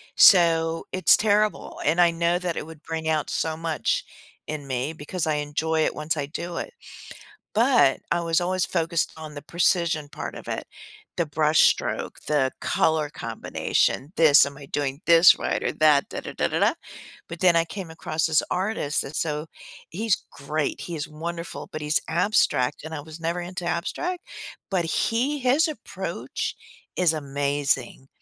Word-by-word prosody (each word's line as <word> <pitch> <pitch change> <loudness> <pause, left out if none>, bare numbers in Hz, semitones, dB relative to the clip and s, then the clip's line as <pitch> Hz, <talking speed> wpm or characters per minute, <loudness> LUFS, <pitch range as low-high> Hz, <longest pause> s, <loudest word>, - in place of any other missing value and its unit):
So, 165 -4 +5
it's 185 0 +5
terrible, 210 0 +1
and 160 +4 +2
I 170 -1 +5
know 170 +1 +1
that 175 -2 -2
it - - -4
would 160 -1 -12
bring 160 -1 -4
out 155 -2 0
so 160 -1 -1
much 160 -2 -1 0.4
in 150 -2 -5
me, 130 +4 -2
because 160 +2 -4
I 155 - +1
enjoy 155 +2 0
it - - -1
once 155 +1 -2
I 145 - -1
do 170 +3 -5
it. - - -5 0.8
But, 230 - +4
I 175 - +2
was 165 -1 +1
always 185 0 0
focused 170 -2 0
on 155 -1 -8
the 145 - -7
precision 170 -1 +1
part - - -6
of - - -10
it, - - -4 0.5
the 170 - +1
brush 155 +1 +2
stroke, - - +1
the 145 -3 +2
color 155 -2 +1
combination, 145 -1 -1
this, 155 -4 +7
"Am 140 - -7
I 145 - -10
doing 140 0 -2
this 170 +1 +7
right, - - -1
or - - 0
that?" 150 -3 +4
Da - - -5
da - - -7
da - - 0
da - - -2
da. - - +4 0.5
But 170 - -8
then 180 -2 +5
I 165 - +2
came 185 0 -7
across 160 0 -2
this 155 -1 +3
artist, 185 -6 -1
and 140 - -8
so 155 -1 -2 0.4
he's 210 +3 +1 0.2
great, 150 +1 -3
he 170 - -5
is 150 +1 -4
wonderful, 170 +2 -6
but 155 - -4
he's 150 +1 +1
abstract, 160 - +1
and 160 - -7
I 145 - -5
was 155 +2 -11
never 170 +2 -2
into 180 0 -6
abstract. 340 - -3 0.5
But 180 -3 +1
he 240 - 0
his 265 +5 +3
approach, 310 - -5 0.4
is 175 -3 +3
amazing. 140 -2 -2
160 Hz, 175 wpm, -25 LUFS, 150-175 Hz, 0.8 s, this